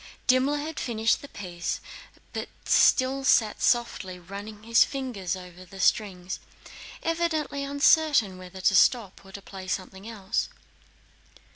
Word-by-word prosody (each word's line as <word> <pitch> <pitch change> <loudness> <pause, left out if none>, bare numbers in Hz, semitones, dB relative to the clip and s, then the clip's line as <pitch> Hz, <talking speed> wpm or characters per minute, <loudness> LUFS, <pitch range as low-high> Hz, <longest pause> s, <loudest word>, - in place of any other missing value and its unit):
Dimmler 260 +3 +3
had 300 +1 -5
finished 225 -2 +1
the 285 - -9
piece 175 -8 -5 0.5
but - - -4 0.2
still 265 +1 +4
sat 220 -5 +3
softly 235 -6 0
running 200 +4 -9
his 230 +1 +5
fingers 235 -10 -4
over 180 -1 -11
the 195 +2 -13
strings, 185 -2 0 0.6
evidently 325 -4 -1
uncertain 280 - +3
whether 185 +1 -10
to 190 - +3
stop 205 -1 +3
or 195 - -15
to 200 0 -9
play 190 -1 -9
something 190 +3 -5
else. 215 -1 -2
215 Hz, 130 wpm, -27 LUFS, 190-265 Hz, 0.6 s, his